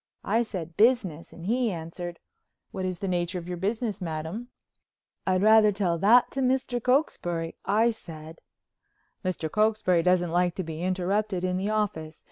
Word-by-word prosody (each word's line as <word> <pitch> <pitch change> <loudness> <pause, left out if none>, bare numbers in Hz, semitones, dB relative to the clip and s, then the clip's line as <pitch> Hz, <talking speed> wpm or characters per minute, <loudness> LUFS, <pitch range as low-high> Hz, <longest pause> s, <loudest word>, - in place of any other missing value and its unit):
I 225 +4 +2
said 175 -8 -5
business, 210 -9 +2
and 170 - -10
he 240 +3 +1
answered: 170 +1 -6 0.5
"What 190 -1 -4
is 185 -1 -2
the 195 - -4
nature 175 0 -1
of 175 -1 -7
your 180 -1 -4
business, 210 +2 -2
Madam?" 165 +7 -4 0.8
"I'd 185 0 +2
rather 215 0 +6
tell 185 -4 0
that 225 +7 +5
to 270 - -2
Mr. 255 -1 0
Cokesbury," 175 - 0
I 225 +3 +3
said. 160 -6 -11 0.8
"Mr. 185 -4 -2
Cokesbury 210 -2 +2
doesn't 175 -1 +2
like 175 0 +1
to 190 - -3
be 160 -1 -6
interrupted 185 +1 -1
in 180 0 0
the 195 +3 -1
office. 175 -8 -2
185 Hz, 160 wpm, -27 LUFS, 170-215 Hz, 0.8 s, rather